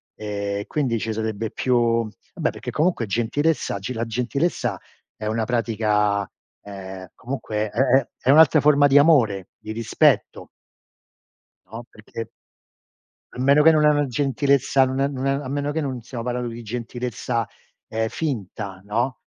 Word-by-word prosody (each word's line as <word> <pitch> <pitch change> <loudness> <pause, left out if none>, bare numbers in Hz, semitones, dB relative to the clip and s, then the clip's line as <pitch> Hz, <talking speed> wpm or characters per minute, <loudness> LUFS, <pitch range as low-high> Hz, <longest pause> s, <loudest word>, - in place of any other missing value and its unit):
ehm, 100 -1 -4
quindi 130 -7 -1
ci 115 - -3
sarebbe 110 0 -3
più 115 -2 +1 0.3
vabbè, - - 0
perché - - -7
comunque 155 -8 0
gentilezza 135 +9 0
oggi 100 +6 -4
la 115 -1 -2
gentilezza 125 +8 -1 0.4
è 105 - -7
una 110 +1 -1
pratica 105 -4 0 0.3
ehm, 95 -2 -9
comunque 110 -4 -3
è 115 - -4
è 135 -1 +3 0.2
è - - +4
un'altra 155 +1 +7
forma 145 -1 +5
di 140 +1 +6
amore, 115 - +3
di 110 - -8
rispetto. 115 0 +1 1.2
No, 115 +2 -7
perché 110 +1 -8 1.1
a - - -11
meno 140 +3 +5
che 160 - +7
non 155 -1 +4
è - - +7
una 145 -1 +2
gentilezza 135 +1 +2
non 130 +1 -2
è 140 - +2
non 135 -2 -5
è - - +3
a 140 -1 -3
meno 145 +2 -2
che 160 - -1
non 130 -5 -4
stiamo 120 0 -6
parlando 125 0 -2
di 115 +1 -8
gentilezza, 120 0 -3 0.4
ehm, 110 0 -1
finta, 100 - -4
no, 120 +5 -2
120 Hz, 155 wpm, -23 LUFS, 110-140 Hz, 1.2 s, un'altra